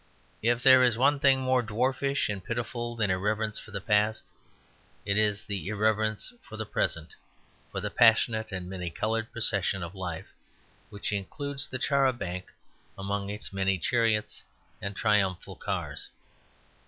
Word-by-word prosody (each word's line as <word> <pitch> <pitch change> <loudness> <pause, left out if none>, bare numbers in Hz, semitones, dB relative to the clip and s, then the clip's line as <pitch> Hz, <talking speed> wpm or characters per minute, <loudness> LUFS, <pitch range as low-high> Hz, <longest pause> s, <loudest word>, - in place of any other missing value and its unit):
If 120 +2 +2
there 130 -1 +8
is 120 -3 +4
one 140 +3 +4
thing 135 -1 +5
more 130 -1 +3
dwarfish 130 +5 0
and 100 -3 -4
pitiful 120 +1 -3
than 110 -4 +1
irreverence 105 +3 0
for - - -12
the - - -4
past, 105 +1 +2 0.8
it 100 - +1
is 105 -1 +2
irreverence 110 - 0
for 110 - -10
the 110 - -3
present, 80 -5 -1 0.6
for - - -3
the - - -3
passionate 115 -1 +4
and 90 -2 -5
many 90 -2 -4
coloured 115 +5 -2
procession 100 -5 0
of 85 +1 -6
life, 90 -4 -6 0.6
which 105 -1 -4
includes 140 +8 -1
the 130 - -2
char 135 +1 +3
a 130 - +2
banc 90 -5 -5 0.5
among 100 0 -3
its 105 -1 -5
many 95 0 +1
chariots 110 +3 +1 0.4
and 100 0 -4
triumphal 100 -4 +1
cars. - - -4
110 Hz, 150 wpm, -28 LUFS, 100-120 Hz, 0.8 s, there